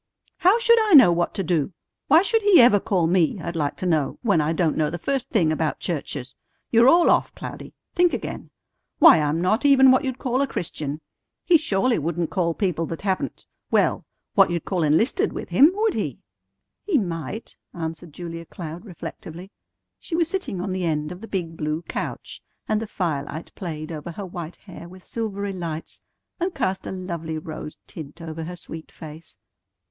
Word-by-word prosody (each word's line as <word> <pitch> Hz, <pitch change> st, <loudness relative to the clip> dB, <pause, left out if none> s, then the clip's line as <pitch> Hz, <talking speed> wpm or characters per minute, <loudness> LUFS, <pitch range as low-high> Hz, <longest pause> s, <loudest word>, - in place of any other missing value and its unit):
How 375 Hz, +5 st, +5 dB
should 465 Hz, -1 st, +5 dB
I -, -, +3 dB
know 255 Hz, -11 st, +9 dB
what 170 Hz, 0 st, 0 dB
to 195 Hz, -, -1 dB
do? 170 Hz, 0 st, 0 dB, 0.3 s
Why 320 Hz, +5 st, +6 dB
should 450 Hz, +2 st, +2 dB
He 410 Hz, -3 st, +6 dB
ever 235 Hz, -4 st, +7 dB
call 185 Hz, -4 st, +1 dB
me, 175 Hz, +2 st, +2 dB
I'd 170 Hz, +1 st, -5 dB
like 145 Hz, -3 st, -1 dB
to -, -, -4 dB
know, 155 Hz, -5 st, +1 dB
when 200 Hz, -9 st, +3 dB
I 150 Hz, +2 st, 0 dB
don't 165 Hz, -1 st, +1 dB
know 155 Hz, -1 st, +1 dB
the 170 Hz, -, -4 dB
first 270 Hz, +7 st, -2 dB
thing 175 Hz, -10 st, +2 dB
about 155 Hz, -1 st, -1 dB
churches? 140 Hz, -6 st, -4 dB, 0.4 s
You're 235 Hz, +2 st, +6 dB
all 340 Hz, +4 st, +5 dB
off, -, -, +1 dB
Cloudy. -, -, -8 dB, 0.2 s
Think 355 Hz, -1 st, +4 dB
again. -, -, -5 dB, 0.5 s
Why, 160 Hz, -, +8 dB
I'm 150 Hz, +2 st, 0 dB
not 215 Hz, +8 st, +1 dB
even 265 Hz, -2 st, +7 dB
what 260 Hz, +3 st, +3 dB
you'd 260 Hz, -2 st, -3 dB
call 255 Hz, 0 st, 0 dB
a 280 Hz, -, +1 dB
Christian. 155 Hz, -, -4 dB, 0.4 s
He 355 Hz, -, +5 dB
surely 250 Hz, -, +2 dB
wouldn't 165 Hz, +1 st, -2 dB
call 170 Hz, -1 st, 0 dB
people 175 Hz, -5 st, -1 dB
that 165 Hz, -, -6 dB
haven't 190 Hz, -2 st, -2 dB, 0.2 s
well, -, -, +2 dB, 0.3 s
what 195 Hz, -2 st, +5 dB
you'd 170 Hz, -2 st, -2 dB
call 185 Hz, -3 st, -1 dB
enlisted 220 Hz, -, +2 dB
with -, -, -6 dB
Him, 290 Hz, +4 st, +6 dB
would 435 Hz, 0 st, +1 dB
He?" -, -, -3 dB, 0.7 s
"He 385 Hz, -7 st, +2 dB
might," 175 Hz, -, -4 dB, 0.2 s
answered 165 Hz, 0 st, -6 dB
Julia 165 Hz, +1 st, -7 dB
Cloud 165 Hz, +3 st, -8 dB
reflectively. 180 Hz, -1 st, -9 dB, 0.5 s
She 330 Hz, -, -5 dB
was 335 Hz, -1 st, +2 dB
sitting 280 Hz, -, -3 dB
on 190 Hz, +1 st, -3 dB
the 185 Hz, -1 st, -2 dB
end 155 Hz, -2 st, -1 dB
of 180 Hz, +2 st, -9 dB
the 225 Hz, -, -8 dB
big 170 Hz, -5 st, -3 dB
blue 155 Hz, +1 st, -3 dB
couch, -, -, -6 dB, 0.3 s
and 215 Hz, 0 st, +1 dB
the 225 Hz, -, -4 dB
firelight 160 Hz, -4 st, -3 dB
played 155 Hz, -3 st, -6 dB
over 160 Hz, +2 st, -6 dB
her 200 Hz, +3 st, -6 dB
white 175 Hz, -2 st, -7 dB
hair 175 Hz, -3 st, -12 dB
with 185 Hz, 0 st, -14 dB
silvery 200 Hz, -3 st, -3 dB
lights, 165 Hz, -3 st, -6 dB, 0.4 s
and 355 Hz, 0 st, -2 dB
cast 190 Hz, 0 st, -2 dB
a -, -, -4 dB
lovely 170 Hz, -4 st, -4 dB
rose 155 Hz, -1 st, -7 dB
tint 155 Hz, 0 st, -10 dB
over 160 Hz, -1 st, -6 dB
her 180 Hz, +2 st, -6 dB
sweet 160 Hz, -2 st, -9 dB
face. 155 Hz, -, -11 dB
175 Hz, 190 wpm, -23 LUFS, 160-225 Hz, 0.7 s, know